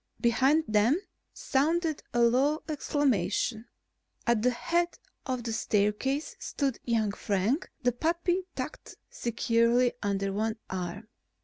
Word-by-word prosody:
Behind 265 +6 +3
them 220 - +3 0.3
sounded 315 +3 0
a 240 - +1
low 270 +6 +3
exclamation. 245 - 0 0.6
At 235 -2 +3
the 250 - +4
head 345 +8 0 0.3
of 255 -2 -2
the 230 -1 -3
staircase 220 +8 0
stood 275 -4 -2
young 225 -3 +1
Frank, 205 - 0
the 245 - +4
puppy 340 +7 0
tucked - - -6 0.2
securely 235 +1 +2
under 195 -1 -1
one 220 +2 0 0.2
arm. 185 +3 -4
240 Hz, 115 wpm, -29 LUFS, 215-290 Hz, 0.6 s, the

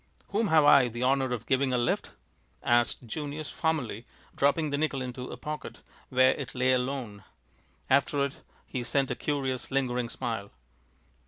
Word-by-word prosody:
"Whom 215 +2 +1
have 160 -3 +5
I 140 -3 +7
the 120 +1 -4
honor 135 0 +2
of 115 -2 -3
giving 130 0 +2
a 125 - +2
lift?" 120 -1 -1 0.5
asked 120 +1 +2
Junius, 150 +4 -5
formally, 130 -9 -2 0.3
dropping 145 +2 +2
the 145 - 0
nickel 155 -3 0
into 125 0 -5
a - - -7
pocket, 150 0 -6 0.3
where 130 0 +5
it 140 -3 -5
lay 130 +1 +3
alone. 125 -5 -2 0.6
After 140 +1 +3
it 140 - -7 0.3
he 130 - -4
sent 135 +2 +1
a - - -1
curious, 135 -4 -2
lingering 125 -3 0
smile. 115 -5 -4
130 Hz, 160 wpm, -29 LUFS, 125-145 Hz, 0.6 s, I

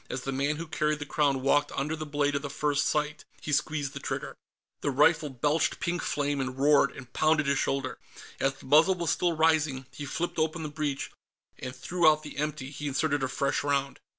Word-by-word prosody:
As 125 - -3
the 135 - -3
man 140 +3 0
who 165 +2 -5
carried 155 -1 0
the 145 - -6
Crown 140 -3 +1
walked 145 +1 +3
under 150 +3 -1
the 155 -1 -6
blade 145 0 0
of 140 - -1
the 140 - -5
front 145 0 0
sight, 150 0 0 0.2
he 150 - -5
squeezed 145 -1 0
the 140 - -6
trigger. - - -4 0.4
The - - -1
rifle 150 +3 +3
belched 145 +5 0
pink 175 -2 -1
flame 145 -1 -1
and 130 0 -4
roared 140 0 +5
and 125 -2 -11
pounded 155 -1 +3
his 140 0 +1
shoulder. 135 -1 -1 0.4
As 135 0 +1
the - - -15
muzzle 155 +7 +5
was 170 -3 -1
still 175 -2 +1
rising, 155 -4 +2
he 145 - -7
flipped 165 +4 -3
open 160 +1 0
the 155 - -4
breech, 145 -2 -3 0.5
and 130 +1 -6
threw 170 +5 +3
out 155 0 +1
the 150 - -9
empty. 150 -2 -3
He 150 0 -5
inserted 145 +1 0
a 130 - +1
fresh 135 +2 -1
round. 140 -1 0
145 Hz, 215 wpm, -28 LUFS, 140-155 Hz, 0.5 s, roared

